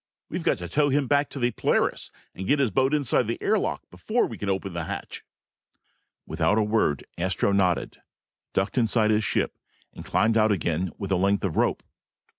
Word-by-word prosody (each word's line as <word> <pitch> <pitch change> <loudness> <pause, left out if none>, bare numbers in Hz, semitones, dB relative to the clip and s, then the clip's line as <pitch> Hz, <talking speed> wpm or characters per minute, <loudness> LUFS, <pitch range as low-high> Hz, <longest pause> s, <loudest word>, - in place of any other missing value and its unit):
We've - - -3
got - - +1
to 90 - -6
tow 145 +6 +2
him 140 +1 +2
back 145 +2 +2
to - - -8
the 120 -2 +1
Polaris - - 0 0.2
and 95 - -6
get 145 - +3
his 135 -6 +1
boat 130 +5 +2
inside 140 -5 +1
the 115 - -3
air 215 0 +2
lock - - -3
before 235 +3 0
we 115 - -6
can 100 -1 -4
open 95 -1 -2
the 85 -1 -3
hatch!" - - -6 1.0
Without 105 - +1
a 110 - +3
word, 105 -9 +1 0.2
Astro 95 +3 +1
nodded, 95 -3 +1 0.5
ducked 100 +6 0
inside 110 -2 +2
his 110 0 +2
ship, - - -1 0.3
and - - -9
climbed 110 +1 +2
out 110 0 +4
again 90 -2 0
with 100 -1 -5
a 95 - +3
length 100 +2 +1
of 90 - -2
rope. - - +1
110 Hz, 200 wpm, -25 LUFS, 95-130 Hz, 1.0 s, out